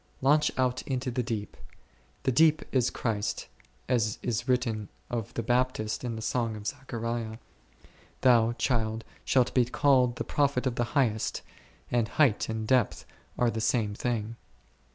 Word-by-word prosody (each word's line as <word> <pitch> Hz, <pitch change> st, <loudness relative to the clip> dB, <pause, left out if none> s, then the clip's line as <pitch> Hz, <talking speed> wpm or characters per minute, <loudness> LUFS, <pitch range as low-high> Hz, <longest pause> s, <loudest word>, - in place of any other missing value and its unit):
Launch 150 Hz, +3 st, +3 dB
out 130 Hz, -1 st, +1 dB
into 130 Hz, -1 st, -2 dB
the 125 Hz, +1 st, 0 dB
deep; 110 Hz, -3 st, -4 dB, 0.7 s
the 130 Hz, -, +2 dB
deep 155 Hz, +4 st, +4 dB
is 125 Hz, -3 st, +2 dB
Christ, 110 Hz, -3 st, -2 dB, 0.4 s
as 115 Hz, -4 st, +1 dB
is 120 Hz, +1 st, -1 dB
written 115 Hz, -5 st, 0 dB, 0.2 s
of 115 Hz, -3 st, -3 dB
the 115 Hz, -, -1 dB
Baptist 120 Hz, -2 st, 0 dB
in 120 Hz, -2 st, -3 dB
the 110 Hz, -, -6 dB
Song 115 Hz, -2 st, -1 dB
of 105 Hz, -1 st, -9 dB
Zechariah, 115 Hz, -4 st, -4 dB, 0.8 s
Thou, 120 Hz, -2 st, +5 dB
child, 115 Hz, -3 st, -1 dB, 0.2 s
shalt 125 Hz, -2 st, +2 dB
be 125 Hz, -2 st, +4 dB
called 125 Hz, -1 st, +3 dB
the -, -, -3 dB
prophet 140 Hz, -3 st, +1 dB
of 130 Hz, -, +1 dB
the 120 Hz, +4 st, -2 dB
Highest, 110 Hz, -6 st, +1 dB, 0.5 s
and 120 Hz, -2 st, +2 dB
height 125 Hz, -3 st, +2 dB
and 110 Hz, -1 st, -3 dB
depth 125 Hz, -3 st, +2 dB, 0.3 s
are 120 Hz, -1 st, +2 dB
the 110 Hz, -, -3 dB
same 110 Hz, -3 st, +1 dB
things. 115 Hz, 0 st, -2 dB
120 Hz, 155 wpm, -28 LUFS, 110-130 Hz, 0.8 s, Thou